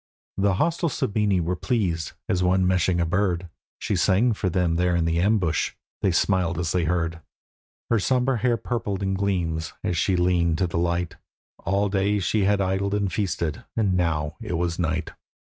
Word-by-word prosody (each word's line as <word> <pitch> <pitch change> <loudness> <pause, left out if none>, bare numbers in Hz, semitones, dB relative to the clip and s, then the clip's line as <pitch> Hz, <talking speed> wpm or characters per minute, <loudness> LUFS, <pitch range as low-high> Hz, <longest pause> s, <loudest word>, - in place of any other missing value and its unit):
The 100 -1 +2
hostile 170 - +1
Sabini 105 -6 0
were 85 +2 -1
pleased, 90 -7 -1
as 90 - 0
one 90 +1 +3
meshing 90 -1 +2
a 85 - +2
bird; 90 0 0 0.3
She - - -2
sang 110 +6 +3
for 100 -2 -1
them 85 -1 +1
there 90 0 +2
in 85 -1 +1
the 85 0 +1
ambush: 95 -4 +1 0.3
they 95 - +3
smiled 90 -1 +1
as 85 -2 -1
they 90 -2 +1
heard. 85 0 -1 0.7
Her 115 - +4
sombre 125 +3 +1
hair 120 +1 +2
purpled 105 -6 -3
in 95 0 0
gleams, 90 -5 -1
as 95 -3 -1
she 95 +3 +2
leaned 90 -2 +2
to 95 - +1
the 85 -1 -2
light; 85 0 -1 0.5
All 100 +2 +1
day 100 +1 +1
she 100 +2 +1
had 100 0 +2
idled 95 +1 0
and 100 -2 -1
feasted, 85 -6 -2
and 100 -4 +2
now 85 -2 0
it 105 -5 -4
was 85 0 -1
night. 80 -1 -1
90 Hz, 185 wpm, -24 LUFS, 85-100 Hz, 0.7 s, Her